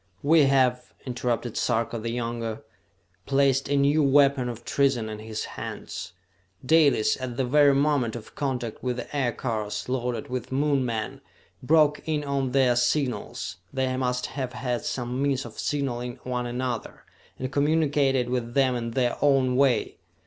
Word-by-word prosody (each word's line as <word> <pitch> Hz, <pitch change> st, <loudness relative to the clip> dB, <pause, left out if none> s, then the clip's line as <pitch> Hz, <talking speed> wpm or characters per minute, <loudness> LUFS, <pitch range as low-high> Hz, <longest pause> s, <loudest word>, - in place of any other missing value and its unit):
"We 155 Hz, 0 st, +5 dB
have," 125 Hz, -2 st, +2 dB
interrupted 120 Hz, -2 st, -2 dB
Sarka 115 Hz, -1 st, 0 dB
the 115 Hz, +1 st, -4 dB
Younger, 115 Hz, -1 st, -3 dB, 0.6 s
"placed 135 Hz, 0 st, +2 dB
a 145 Hz, -, +2 dB
new 140 Hz, +3 st, +3 dB
weapon 140 Hz, -2 st, +4 dB
of 120 Hz, 0 st, -8 dB
treason 135 Hz, -5 st, +1 dB
in 105 Hz, 0 st, -6 dB
his 110 Hz, 0 st, -5 dB
hands! 90 Hz, -, -7 dB, 0.5 s
Dalis, 140 Hz, -5 st, +3 dB
at 125 Hz, -2 st, -5 dB
the 135 Hz, -, +1 dB
very 140 Hz, +2 st, +5 dB
moment 140 Hz, -5 st, +1 dB
of 115 Hz, -, -9 dB
contact 125 Hz, -5 st, -3 dB
with 125 Hz, -1 st, -1 dB
the 135 Hz, -, -7 dB
aircars, 115 Hz, -5 st, -2 dB
loaded 125 Hz, +1 st, -2 dB
with 125 Hz, -2 st, -5 dB
Moon 140 Hz, 0 st, +1 dB
men, 115 Hz, -3 st, -3 dB, 0.4 s
broke 150 Hz, +2 st, +3 dB
in 150 Hz, -2 st, 0 dB
on 140 Hz, -2 st, -1 dB
their 130 Hz, -2 st, +3 dB
signals 120 Hz, -, -1 dB
they 130 Hz, -1 st, -1 dB
must 125 Hz, -1 st, -1 dB
have 130 Hz, -2 st, -4 dB
had 125 Hz, -2 st, -2 dB
some 125 Hz, +1 st, -3 dB
means 135 Hz, -2 st, 0 dB
of 115 Hz, -, -10 dB
signalling 125 Hz, -4 st, -2 dB
one 125 Hz, -1 st, -2 dB
another 120 Hz, -1 st, -4 dB, 0.3 s
and 130 Hz, 0 st, -4 dB
communicated 145 Hz, -3 st, +2 dB
with 125 Hz, -1 st, -3 dB
them 130 Hz, -2 st, +3 dB
in 115 Hz, -1 st, -3 dB
their 120 Hz, 0 st, 0 dB
own 135 Hz, -3 st, +3 dB
way! 130 Hz, -4 st, +2 dB
130 Hz, 155 wpm, -26 LUFS, 120-140 Hz, 0.6 s, We